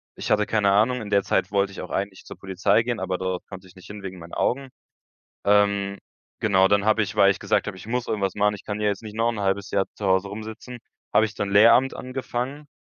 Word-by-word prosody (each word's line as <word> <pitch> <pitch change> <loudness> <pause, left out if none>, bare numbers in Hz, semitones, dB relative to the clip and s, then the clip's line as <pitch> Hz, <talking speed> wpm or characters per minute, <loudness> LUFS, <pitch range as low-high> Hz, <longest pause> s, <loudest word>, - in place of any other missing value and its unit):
ich - - -5
hatte 105 0 +3
keine 105 -3 +2
Ahnung, 120 +4 +2
in 105 - -7
der 100 -1 +3
Zeit - - 0
wollte 100 0 +1
ich - - -10
auch 90 - -8
eigentlich 100 -1 -3
zur - - -10
Polizei 95 +4 +1
gehen, 120 -1 -2
aber 95 -1 -2
dort 95 -1 -4
konnte 95 -1 -10
ich 90 - -19
nicht 95 - -15
hin 105 -1 -9
wegen 95 -1 -7
meinen 85 +1 -12
Augen. 135 +2 0 0.8
Ähm, 100 -1 +2 0.4
genau, 95 -3 +3
dann 100 -1 +2
habe 110 0 +3
ich, 105 +1 -4
weil 100 -1 +6
ich - - -11
gesagt - - +1
habe: 95 - -5
„Ich 105 - -11
muss 125 +1 -1
irgendwas 100 -2 -2
machen, 105 0 +2
ich 100 - -10
kann 105 0 -4
ja 105 - 0
jetzt 100 0 -1
nicht 110 -1 -9
noch 115 +1 +2
‘n 105 - -5
halbes 95 0 -1
Jahr 100 -1 +1
zu 105 - -4
Hause 95 +1 +2
rumsitzen“, 110 +4 -8 0.3
habe 110 - +5
ich 110 -1 -4
dann 100 -1 -3
Lehramt 115 +6 +6
angefangen. 130 +2 -5
100 Hz, 250 wpm, -24 LUFS, 95-110 Hz, 0.8 s, weil